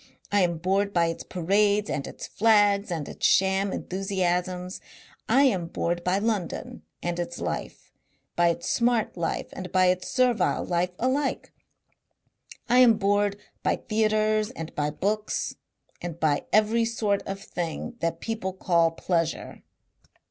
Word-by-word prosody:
I 205 0 +3
am 170 -2 +1
bored 195 +4 0
by 170 -1 +3
its 165 - -5
parades 200 +3 +1
and 140 - -3
its - - -8
flags 205 -2 +3
and 160 -5 -3
its - - -10
sham 190 +1 +3
enthusiasms. 185 -1 -2 0.5
I 275 - +5
am 190 -11 +2
bored 170 +1 -2
by 180 +2 +1
London 205 -4 -2 0.2
and 175 0 -2
its 175 0 -4
life, - - -5 0.4
by 175 0 +4
its 170 - -1
smart 235 -2 +1
life 170 -2 -2
and 185 -2 -7
by 185 -1 +4
its 185 0 -3
servile 250 -6 +2
life 180 +1 -1
alike. 265 +3 -1 1.1
I 245 +1 +4
am 235 -4 +7
bored 205 0 +1 0.2
by - - +1
theatres 215 -1 +1
and 165 -1 -7
by 145 0 -1
books 210 +7 -2 0.5
and 170 -2 -6
by 150 -3 +1
every 215 +2 +3
sort 215 -3 0
of 195 0 -4
thing 180 +7 -5
that 165 0 -2
people 225 -5 -3
call 170 -3 +2
pleasure. 165 -1 -2
190 Hz, 145 wpm, -26 LUFS, 175-215 Hz, 1.1 s, am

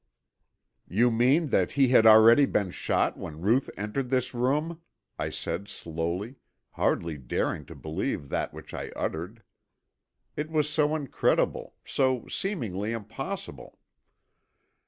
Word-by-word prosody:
"You 120 +6 +3
mean 130 +8 +3
that 95 -7 +1
he 135 -2 +4
had 115 -3 +6
already 115 +5 +8
been 95 -3 0
shot - - 0
when 75 0 -7
Ruth 115 +8 +2
entered 105 +6 -3
this 130 -1 0
room?" 150 +7 0 0.4
I - - -1
said 90 +5 -4
slowly, 85 - -4 0.3
hardly 80 -3 -1
daring 60 -3 -2
to - - -10
believe 75 -2 -3
that - - -2
which - - -11
I - - -5
uttered. 90 +8 -4 0.9
It 150 +1 -3
was 155 -2 +1
so 150 0 +1
incredible, 145 -4 0
so 130 -3 0
seemingly 115 - -2
impossible! 115 - -7
115 Hz, 125 wpm, -27 LUFS, 95-140 Hz, 0.9 s, already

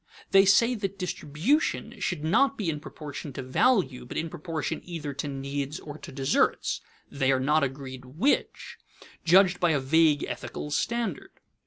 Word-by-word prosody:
They 195 0 +7
say 230 +5 +5
that 200 -4 -4
distribution 180 - -1
should 150 - -2
be - - -1
not 275 +8 +3
in 165 -7 -1
proportion 145 -2 -8
to 135 - -5
value, 135 - +2
but 125 - -7
in 165 0 -2
proportion 160 -5 -4
either 160 -5 -5
to 140 +2 -4
needs 140 +1 -4
or 150 0 -9
to - - -10
deserts 135 +1 +1 0.3
(they 135 -1 +1
are 130 - +2
not 150 +3 +2
agreed 130 -1 -5
which), 165 - -1 0.4
judged 180 +1 +5
by 175 -3 +3
a 145 - +2
vague 150 +2 +3
ethical 150 - -5
standard. 230 -1 -2
155 Hz, 160 wpm, -27 LUFS, 140-185 Hz, 0.4 s, They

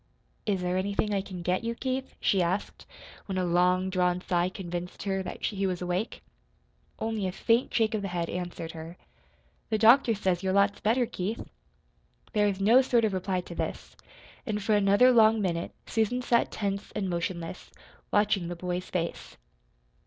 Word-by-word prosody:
"Is 195 -3 +1
there 180 0 0
anything 200 +2 0
I 195 - +1
can 185 -2 -8
get 180 +5 0
you, 230 0 -2
Keith?" 260 +1 -3
she 195 - +2
asked, 180 +4 -2 0.4
when 190 -2 -3
a 185 - +1
long 180 +2 +2
drawn 180 -1 +1
sigh 180 -1 0
convinced 175 -1 -6
her 195 -1 -1
that 185 - -7
he 195 -2 -1
was 180 -2 -2
awake. 180 +5 -3 0.7
Only 220 -3 -2
a - - -2
faint 230 +6 +1
shake 225 -1 +2
of 215 - -1
the 200 - -3
head 175 -2 -2
answered 175 -2 -5
her. 165 +2 -9 0.7
"The 220 - +1
doctor 230 +2 +6
says 185 -3 0
you're 190 -1 0
lots 200 +1 +3
better, 235 +4 +2
Keith." 210 +1 -4 0.9
There 210 -2 +3
was 200 -1 -1
no 225 +6 +6
sort 240 -3 +2
of 210 - 0
reply 185 0 -1
to 175 - -10
this; - - -5 0.5
and 210 -2 -3
for 215 - +2
another 205 +5 +5
long 225 -2 +5
minute 170 -4 -1
Susan 235 +3 0
sat 235 -1 +2
tense 200 -1 -3
and 195 - -1
motionless, 170 0 -4 0.4
watching 205 -4 +2
the 175 - -4
boy's 180 +1 -4
face. 170 -2 -4
195 Hz, 175 wpm, -28 LUFS, 180-215 Hz, 0.9 s, doctor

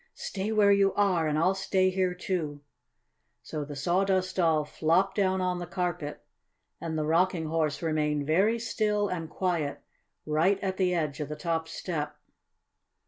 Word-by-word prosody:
"Stay 200 +2 -4
where 210 -2 +5
you 200 -1 +4
are 185 -6 +2
and 150 0 0
I'll 180 +4 +3
stay 190 -1 +1
here 185 -1 0
too!" 160 -6 -3 0.8
So 150 - -4
the 145 0 -7
Sawdust 185 +5 +1
Doll 160 -4 +3
flopped 165 +6 +1
down 190 -2 +1
on 180 -1 0
the 175 - -5
carpet 175 -4 -3 0.6
and 160 -1 -3
the 155 - 0
Rocking 170 +1 +2
Horse 155 -1 -1
remained 150 -2 0
very 195 +9 +3
still 210 -2 0
and 165 -3 -4
quiet 170 -6 -2 0.4
right 165 +6 +2
at 190 -1 -1
the 180 -2 +2
edge 155 -4 -2
of 150 -1 -4
the 150 - -4
top 160 +1 -2
step. 155 -3 -4
175 Hz, 160 wpm, -28 LUFS, 155-190 Hz, 0.8 s, where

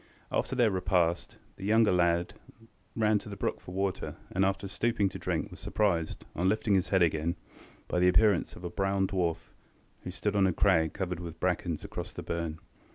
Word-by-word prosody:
After - - -1
their 120 -4 +4
repast, 90 -2 0 0.2
the 95 - -7
younger 110 0 +5
lad 85 -1 +2 0.6
ran 110 -2 +3
to 105 - -10
the 100 - -6
brook - - -2
for - - -10
water, 95 -1 -2 0.2
and, 95 - +1
after 95 +1 0
stooping 105 0 0
to - - -8
drink, - - -2
was - - -11
surprised, 85 -7 -1
on 90 +3 +2
lifting 105 0 +1
his 95 -2 +2
head 95 -2 +4
again, 80 +1 +1 0.5
by 90 - 0
the 90 - +4
appearance 90 +1 +3
of 85 - -12
a 85 - -4
brown 95 0 +1
dwarf, 90 -4 -2 0.5
who - - -5
stood 105 +3 -2
on 100 -1 +4
a 90 - +1
crag 80 -4 +3
covered 90 -3 -3
with 85 -1 -8
brackens 90 -3 -1
across - - -6
the - - -6
burn. 85 -2 -3
95 Hz, 195 wpm, -30 LUFS, 85-100 Hz, 0.6 s, younger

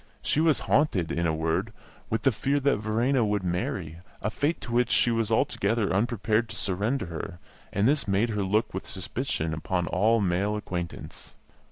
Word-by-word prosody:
She - - +1
was 160 -2 +3
haunted, 105 - +2
in 85 0 0
a 80 - +1
word, 80 +1 -1 0.4
with 110 0 -1
the 135 - +5
fear 135 +6 0
that 140 -3 +3
Verena 115 +5 +1
would 105 -2 0
marry, 85 -2 -2 0.2
a 105 - -2
fate 145 +7 0
to - - -7
which 120 0 +2
she 120 - +4
was 115 -2 0
altogether 110 -2 +1
unprepared 110 +1 +1
to 110 - -6
surrender 105 +7 -1
her; 85 0 -6 0.3
and 100 +3 +2
this 145 -2 +2
made 100 +4 +2
her 105 -2 -1
look 105 +4 +1
with 95 - -5
suspicion 95 - -2
upon 90 +3 -1
all 110 +7 +3
male 100 +2 +1
acquaintance. 90 -5 -6
105 Hz, 180 wpm, -27 LUFS, 90-120 Hz, 0.4 s, the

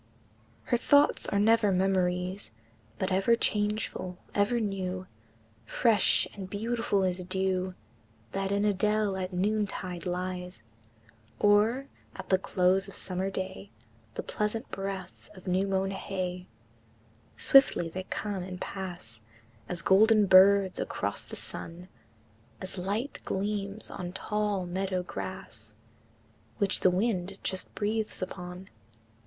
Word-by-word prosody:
IV. - - -17
Her 240 - +5
thoughts 285 +4 +4
are 200 - 0
never 215 0 +4
memories, 185 0 0 0.5
But 190 0 -1
ever 195 +5 +4
changeful, 210 -4 -1 0.2
ever 205 +4 +2
new, 185 -3 -2 0.6
Fresh 220 - +3
and 190 -2 -7
beautiful 210 -1 0
as 180 0 0
dew 185 0 -1 0.6
That 195 0 -2
in 200 +1 +2
a 210 - +3
dell 210 0 +1
at 185 0 -3
noontide 190 -2 -1
lies, 180 -5 -4 0.7
Or, 215 +6 +4 0.3
at 190 - -8
the 190 - +4
close 190 +1 +2
of 195 - -9
summer 185 +1 -2
day, 190 +1 -5 0.5
The - - -3
pleasant 215 +3 -3
breath 195 -1 -6
of 185 - -13
new 190 +1 +1
mown 195 0 0
hay: 185 -2 -4 0.9
Swiftly 270 -10 +5
they 185 +3 -6
come 200 -1 -3
and 180 0 -6
pass 175 - -6 0.5
As 175 -1 -4
golden 215 +2 +6
birds 190 0 +6
across - - -2
the - - -8
sun, 175 +2 -7 0.7
As 185 0 -5
light 210 +9 -2
gleams 200 +1 -2
on 180 -1 -5
tall 210 -2 -1
meadow 185 +1 -2
grass - - -7 0.8
Which 200 -3 +2
the - - +5
wind 190 0 0
just 190 -1 -3
breathes 215 -1 -1
upon. 180 0 -7
190 Hz, 125 wpm, -29 LUFS, 185-205 Hz, 0.9 s, golden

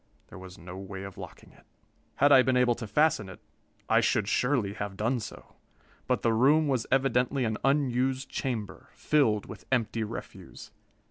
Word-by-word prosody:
There - - -11
was 95 -1 -11
no 90 +2 -10
way 95 0 -7
of 100 -2 -9
locking - - -11
it. - - -22 0.5
Had 145 +1 +4
I 130 - +8
been 130 0 +1
able 125 -1 +3
to 115 -1 -7
fasten 110 -4 +1
it, 95 - -11 0.5
I - - +4
should - - +1
surely 125 -6 0
have 100 -2 -6
done 120 +4 0
so; 105 - -10 0.5
but - - 0
the 115 - +2
room 145 +7 +4
was 130 -5 -1
evidently 130 0 +1
an 110 -1 -2
unused 135 -1 +1
chamber, 110 -8 -5
filled 115 -9 +1
with - - -11
empty 115 -3 0
refuse. 105 - -9
120 Hz, 175 wpm, -28 LUFS, 105-135 Hz, 0.5 s, I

